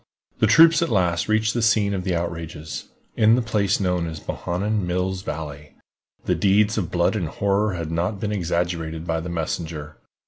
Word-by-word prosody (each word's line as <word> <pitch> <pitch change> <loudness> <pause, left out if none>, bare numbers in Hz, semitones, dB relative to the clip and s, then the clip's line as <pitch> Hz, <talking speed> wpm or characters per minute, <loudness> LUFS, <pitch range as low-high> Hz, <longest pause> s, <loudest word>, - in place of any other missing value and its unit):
The - - +4
troops 165 0 +7
at 170 - +1
last 90 -6 +1
reached 110 +1 +2
the 120 - -1
scene 110 -3 +3
of 95 -2 -2
the 90 -2 0
outrages, 80 -2 -5 0.3
in 110 +1 +5
the 125 - +1
place 105 -3 +1
known 90 -3 0
as 80 -1 -6
"Bohannan 100 +5 -2
Mills 90 +1 -1
Valley." 75 -4 -7 0.5
The 90 - +2
deeds 100 +5 +3
of 95 -6 -2
blood 90 +3 +1
and 90 -6 -1
horror 100 +4 0
had 85 -2 -4
not 90 +5 -1
been 105 +1 -2
exaggerated 85 -3 -2
by 80 -1 -1
the 85 +2 -6
messenger. 80 -2 -4
90 Hz, 180 wpm, -23 LUFS, 85-105 Hz, 0.5 s, troops